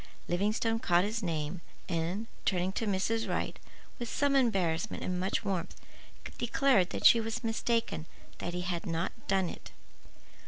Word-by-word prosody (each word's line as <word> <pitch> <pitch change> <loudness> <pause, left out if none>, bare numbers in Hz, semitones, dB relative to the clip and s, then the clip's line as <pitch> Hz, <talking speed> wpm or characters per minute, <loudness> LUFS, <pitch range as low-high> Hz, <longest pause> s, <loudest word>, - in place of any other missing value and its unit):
Livingstone 215 +5 +1
caught 175 -4 +3
his 220 +3 -2
name 165 -1 -2 0.3
and, 175 +4 -1 0.2
turning 185 0 +1
to 220 +3 -2
Mrs. 215 +3 0
Wright, - - -2 0.4
with 240 -1 -4
some 285 -1 +2
embarrassment 190 -11 +1
and 180 -1 -1
much 190 +4 -1
warmth, 185 -3 -2 0.6
declared 240 -6 +3
that - - -4
she 230 - +8
was 225 +2 -3
mistaken, 225 -6 0 0.3
that 175 - -3
he 180 - -1
had 180 +1 -3
not 165 +2 -1 0.2
done 190 -2 +2
it. - - -8
195 Hz, 150 wpm, -31 LUFS, 175-225 Hz, 0.6 s, she